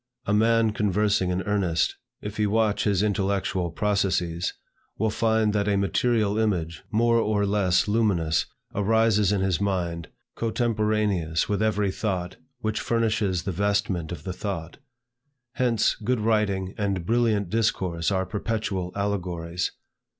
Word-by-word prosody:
A 100 - 0
man 115 +1 +3
conversing 105 -2 +1
in 90 +1 -1
earnest, 95 -5 0 0.3
if 105 0 -6
he 105 -1 +2
watch 110 0 +1
his 100 -2 +2
intellectual 95 -3 0
processes, 90 -2 0 0.5
will 110 +1 +1
find 110 -1 +2
that 105 -1 0
a 100 -1 +2
material 105 +1 +1
image, 85 -7 -1
more 115 +2 +3
or 105 -2 +1
less 100 -3 +2
luminous, 100 -8 +1 0.3
arises 105 -1 +3
in 100 -2 +1
his 95 -1 0
mind, 85 -4 -1 0.3
cotemporaneous 105 -7 0
with 105 0 -1
every 105 -2 +1
thought, 95 -3 -3 0.2
which 110 -1 -1
furnishes 110 -6 0
the 95 - -2
vestment 100 -3 0
of 80 -3 -6
the 90 - -4
thought. 90 -3 -5 0.7
Hence, 120 -4 +2
good 125 +3 -1
writing 105 -4 +1
and 100 -4 -1
brilliant 110 -4 +1
discourse 95 -7 0
are 95 -1 0
perpetual 105 -3 -2
allegories. 90 -4 -2
100 Hz, 135 wpm, -25 LUFS, 90-110 Hz, 0.7 s, man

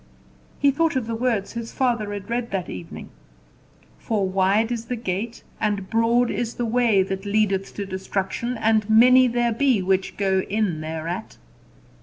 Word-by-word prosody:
He 280 - +4
thought 325 +2 +1
of 260 -3 0
the 230 - -4
words 225 -4 -1
his 230 -1 -5
father 235 -5 0
had 200 -1 -6
read 235 0 -2
that 190 -3 -3
evening 90 -2 -8 0.9
"For 205 -4 -1
wide 195 +4 +2
is 235 -1 -3
the 245 - -3
gate, 220 +1 -4 0.2
and 205 -3 -2
broad 235 +2 +2
is 235 -1 -3
the 240 - -2
way, 230 -4 +3
that 190 0 -4
leadeth 200 -2 0
to 200 - -4
destruction 195 +5 -3
and 220 -1 +1
many 250 +3 +7
there 240 0 +1
be 255 -1 +2
which 190 0 0
go 190 -2 +2
in 200 -6 0
thereat." 160 +5 -5
220 Hz, 165 wpm, -23 LUFS, 195-235 Hz, 0.9 s, many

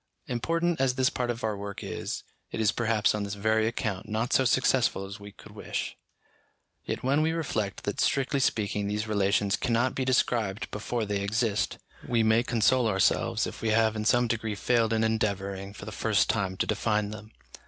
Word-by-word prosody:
Important 165 +7 0
as 130 -2 +2
this 130 -1 +2
part 125 -1 -2
of 115 -1 -3
our 110 -1 0
work 100 0 -6
is, - - -4 0.3
it - - -4
is 110 -2 +3
perhaps 115 -2 +1
on 105 - -2
this 100 0 -3
very 110 +2 +2
account 110 -3 -3
not 110 +3 -1
so 130 - +4
successful 125 -5 +2
as 100 +2 -8
we 100 0 -10
could - - -15
wish. - - -4 0.9
Yet - - -4
when 140 +4 +2
we 160 +1 +1
reflect 115 -11 -2
that 100 - -2
strictly 135 0 +1
speaking 105 -4 0
these 105 +2 -2
relations 100 0 +2
cannot 125 +1 +1
be 135 - -1
described 115 -5 0
before 110 +2 -2
they 100 -1 -1
exist, 110 +1 0 0.3
we 115 -2 +2
may 110 +1 +4
console 120 +1 +2
ourselves 95 -3 +2
if - - -7
we 115 - 0
have 110 0 +3
in 110 - -2
some 120 +2 +4
degree 110 -2 -2
failed 115 +1 +2
in 110 0 +2
endeavouring 100 -3 -1
for 100 - -10
the - - -6
first - - +2
time 95 -1 -2
to - - +1
define 105 -2 0
them. 105 +1 -10
110 Hz, 195 wpm, -28 LUFS, 105-120 Hz, 0.9 s, so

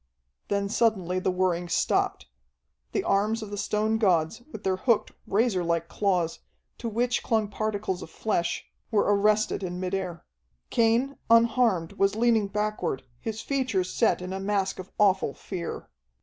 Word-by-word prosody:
Then 200 0 0
suddenly 195 -5 +1
the 185 - 0
whirring 180 -1 0
stopped. 60 - +1 0.7
The - - 0
arms 215 +3 +1
of 210 - -8
the - - -3
stone 215 +2 0
gods, 185 0 +2
with 215 - -8
their 190 -1 +1
hooked, 230 +2 +2 0.2
razorlike 180 -7 +1
claws, 180 -5 0 0.4
to 235 - -3
which 240 +2 0
clung 220 -2 +1
particles 205 -3 -2
of - - -8
flesh, 175 -6 -1 0.2
were 215 -3 +3
arrested 210 +1 +2
in 180 -1 -4
mid 185 0 -3
air. 185 -3 -3 0.5
Cain, 235 +4 +2
unharmed, 230 -6 +4
was 195 +1 +3
leaning 225 -2 +3
backward, 210 -9 -2 0.2
his 220 - -4
features 255 -10 -1
set 225 -5 +2
in 185 +1 -5
a 190 - -3
mask 195 -1 -1
of 185 - -7
awful 190 -8 +3
fear. 180 -4 -6
200 Hz, 150 wpm, -27 LUFS, 185-220 Hz, 0.7 s, unharmed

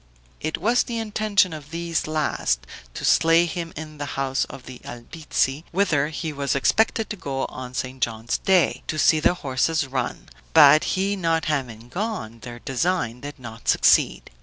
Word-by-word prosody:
It 155 +1 -2
was 235 +7 +2
the 235 - -4
intention 210 -4 +1
of 150 -2 -9
these 170 0 -2
last, 110 - -1 0.3
to - - -4
slay 165 +1 +5
him 170 0 -4
in 155 -1 -8
the 145 - -3
house 135 -1 0
of 130 - -11
the 130 -1 -10
Albizzi, 135 +3 -2
whither 165 -7 +2
he 155 0 -4
was 140 -1 -1
expected 220 - +2
to - - -2
go 135 -7 -3
on 125 -1 -8
St. 130 +1 -4
John's 115 -1 -1
day, 185 -3 +2
to 155 - -2
see 155 +1 +4
the 170 +3 +3
horses 150 +1 0
run, 130 -2 -4 0.3
but 150 +2 +8
he 195 +2 +1
not 165 -4 0
having 125 -7 -3
gone, 175 - -4
their 120 +1 -9
design 130 -1 -1
did 145 +2 -8
not 115 -3 -11
succeed. - - +3
150 Hz, 170 wpm, -23 LUFS, 130-170 Hz, 0.3 s, but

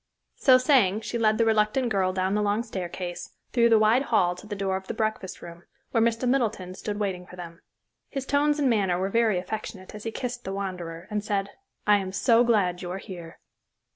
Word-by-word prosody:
So 260 -2 +6
saying, 245 -7 +3
she 235 +1 -3
led 215 -1 +3
the 230 - +3
reluctant 220 +3 +2
girl 190 -3 +1
down 185 +1 -1
the 210 - +1
long 205 +2 +1
staircase, 180 -4 -6 0.2
through 235 -2 +4
the 225 - +6
wide 215 +4 +4
hall 215 -9 +2
to 180 +4 -12
the 205 - -4
door 195 -1 -1
of 190 0 -5
the - - -4
breakfast 215 -4 -3
room, 170 0 -10 0.3
where 230 - +2
Mr. 230 +2 +1
Middleton 225 -8 0
stood 205 +2 -5
waiting 185 -3 -3
for 180 - -12
them. 170 -1 -10 0.5
His 275 -1 -4
tones 290 +2 +2
and 290 -2 +2
manner 200 -7 +2
were 190 +2 -1
very 225 -2 +2
affectionate 190 0 -6
as 210 0 -8
he 225 - -2
kissed 245 +1 -5
the 190 - -4
wanderer, 180 -3 -5
and 210 -1 -1
said, 200 -1 -1 0.3
"I 210 0 +6
am 190 -1 -4
so 235 +3 +4
glad 200 -7 +2
you're 180 0 -4
here." 175 -4 -9
205 Hz, 210 wpm, -26 LUFS, 185-230 Hz, 0.5 s, So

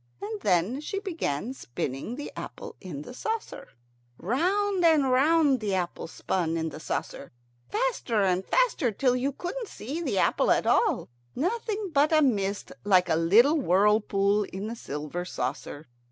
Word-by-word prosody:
And 210 +1 -5
then 200 - +1
she 395 +6 -4
began 265 - -3
spinning 135 - -5
the 290 - -6
apple - - -8
in 150 -7 -7
the 245 - -10
saucer. 440 - -4 0.5
Round 370 - 0
and 305 -6 +4
round 285 +1 +4
the 205 -3 -1
apple 175 -3 -3
spun 165 0 -2
in 160 0 -2
the - - -9
saucer, - - -5 0.4
faster 425 - 0
and 185 -1 +1
faster, 460 - +2
till 250 +4 +1
you 260 +3 0
couldn't 385 - -5
see 290 - -6
the - - -1
apple - - +2
at - - +3
all, 410 - +2 0.3
nothing 415 - -2
but 290 +2 +3
a 310 -1 +5
mist 205 -6 0
like 185 -3 +4
a - - +3
little 225 - +5
whirlpool 205 -1 +3
in 195 +2 -6
the 225 +2 -4
silver 150 -2 -5
saucer. 145 -1 -5
235 Hz, 155 wpm, -27 LUFS, -, 0.5 s, a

